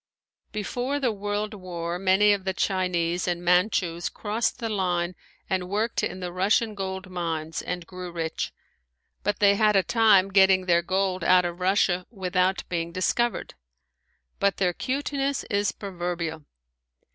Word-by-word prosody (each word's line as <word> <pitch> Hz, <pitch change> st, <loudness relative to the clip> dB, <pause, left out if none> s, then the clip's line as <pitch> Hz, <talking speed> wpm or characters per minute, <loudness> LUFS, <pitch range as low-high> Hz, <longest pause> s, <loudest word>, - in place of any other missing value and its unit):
Before 245 Hz, +6 st, -2 dB
the 255 Hz, -4 st, +1 dB
world 205 Hz, +1 st, -3 dB
war 175 Hz, -3 st, -5 dB
many 195 Hz, +2 st, +4 dB
of 200 Hz, -2 st, -2 dB
the 190 Hz, -1 st, -2 dB
Chinese 180 Hz, -3 st, 0 dB
and 175 Hz, 0 st, -2 dB
Manchus 180 Hz, -1 st, +2 dB
crossed 215 Hz, +2 st, -2 dB
the 235 Hz, -3 st, -3 dB
line 180 Hz, -4 st, 0 dB, 0.3 s
and 185 Hz, -1 st, -2 dB
worked 215 Hz, +4 st, 0 dB
in 185 Hz, -, -3 dB
the 180 Hz, -1 st, -4 dB
Russian 205 Hz, +5 st, +1 dB
gold 190 Hz, -1 st, -5 dB
mines 165 Hz, -3 st, -3 dB
and 180 Hz, -1 st, -4 dB
grew 180 Hz, 0 st, -8 dB
rich, 165 Hz, -1 st, -3 dB, 0.7 s
but 205 Hz, -, -1 dB
they 200 Hz, -1 st, +5 dB
had 215 Hz, -1 st, +4 dB
a 195 Hz, -, +5 dB
time 215 Hz, -4 st, +4 dB
getting 190 Hz, -1 st, +5 dB
their 170 Hz, -1 st, +4 dB
gold 185 Hz, 0 st, -1 dB
out 180 Hz, +1 st, +5 dB
of 175 Hz, 0 st, -4 dB
Russia 185 Hz, -1 st, +2 dB
without 190 Hz, -2 st, 0 dB
being 170 Hz, -1 st, -2 dB
discovered. 235 Hz, +7 st, 0 dB, 0.9 s
But 200 Hz, 0 st, +2 dB
their 180 Hz, -2 st, +1 dB
cuteness 275 Hz, +3 st, -2 dB
is 205 Hz, 0 st, +1 dB
proverbial. 175 Hz, -5 st, -4 dB
185 Hz, 145 wpm, -26 LUFS, 175-205 Hz, 0.9 s, they